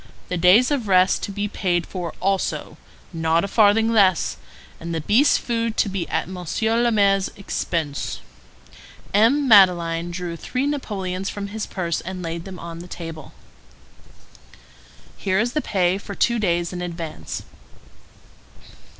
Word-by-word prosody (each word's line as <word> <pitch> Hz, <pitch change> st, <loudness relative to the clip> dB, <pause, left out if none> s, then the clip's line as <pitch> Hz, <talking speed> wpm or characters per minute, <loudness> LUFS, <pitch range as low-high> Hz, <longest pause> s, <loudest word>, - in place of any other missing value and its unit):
The 180 Hz, -, -1 dB
days 185 Hz, -, +5 dB
of 260 Hz, -7 st, -1 dB
rest 185 Hz, 0 st, +4 dB
to -, -, -7 dB
be 205 Hz, +1 st, -2 dB
paid 175 Hz, -4 st, -1 dB
for 175 Hz, -3 st, -6 dB
also—not 170 Hz, -3 st, -2 dB
a -, -, -1 dB
farthing 220 Hz, +2 st, +4 dB
less; 195 Hz, -6 st, +3 dB, 0.4 s
and 170 Hz, 0 st, -5 dB
the 160 Hz, -, -2 dB
beast's 225 Hz, -, +4 dB
food 230 Hz, -2 st, -2 dB
to 205 Hz, -, +2 dB
be 190 Hz, -3 st, -4 dB
at -, -, -1 dB
Monsieur 190 Hz, +6 st, -1 dB
le 240 Hz, 0 st, +2 dB
Maire's 200 Hz, -3 st, +3 dB
expense." 165 Hz, -6 st, -3 dB, 0.9 s
M. 250 Hz, +8 st, +4 dB
Madeleine 175 Hz, -5 st, +5 dB
drew 175 Hz, -1 st, -5 dB
three 255 Hz, -, -3 dB
napoleons 195 Hz, -10 st, -3 dB
from 200 Hz, -1 st, -5 dB
his 215 Hz, +1 st, -5 dB
purse 170 Hz, -4 st, -2 dB
and 185 Hz, 0 st, -6 dB
laid 165 Hz, 0 st, -5 dB
them 190 Hz, -2 st, -8 dB
on 170 Hz, -1 st, -8 dB
the 175 Hz, -, -9 dB
table. 165 Hz, -3 st, -8 dB, 1.8 s
"Here 190 Hz, -1 st, 0 dB
is 235 Hz, +3 st, +1 dB
the 305 Hz, -, 0 dB
pay 185 Hz, -4 st, +1 dB
for 200 Hz, 0 st, -8 dB
two 235 Hz, -1 st, +1 dB
days 175 Hz, -3 st, 0 dB
in 180 Hz, -, -5 dB
advance." 165 Hz, -, -6 dB
190 Hz, 145 wpm, -22 LUFS, 170-215 Hz, 1.8 s, days